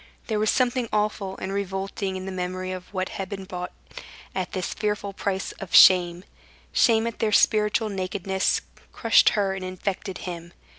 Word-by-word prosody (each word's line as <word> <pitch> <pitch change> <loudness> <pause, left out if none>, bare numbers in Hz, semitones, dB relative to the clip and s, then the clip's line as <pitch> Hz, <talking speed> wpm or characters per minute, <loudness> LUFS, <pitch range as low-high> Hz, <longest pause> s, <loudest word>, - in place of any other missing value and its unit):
There 215 -2 -1
was 215 0 +2
something 250 -2 +1
awful 210 -2 -1
and 190 +1 -4
revolting 195 0 -3
in 185 0 -5
the 190 - -4
memory 185 0 -3
of 185 -1 -7
what 185 -2 -2
had 195 -1 -5
been 195 -2 -5
bought 180 -1 -6 0.6
at 185 -2 -3
this 185 -2 -2
fearful 210 -1 -2
price 195 0 -2
of 195 - -3
shame. 180 -1 +7 0.5
Shame 225 -1 +4
at 230 - -4
their 220 - +1
spiritual 215 +1 +3
nakedness 190 0 -1 0.3
crushed 230 -2 +5
her 195 -2 +1
and 190 -1 -5
infected 185 +1 -4
him. 170 -1 -7
195 Hz, 165 wpm, -25 LUFS, 185-210 Hz, 0.6 s, shame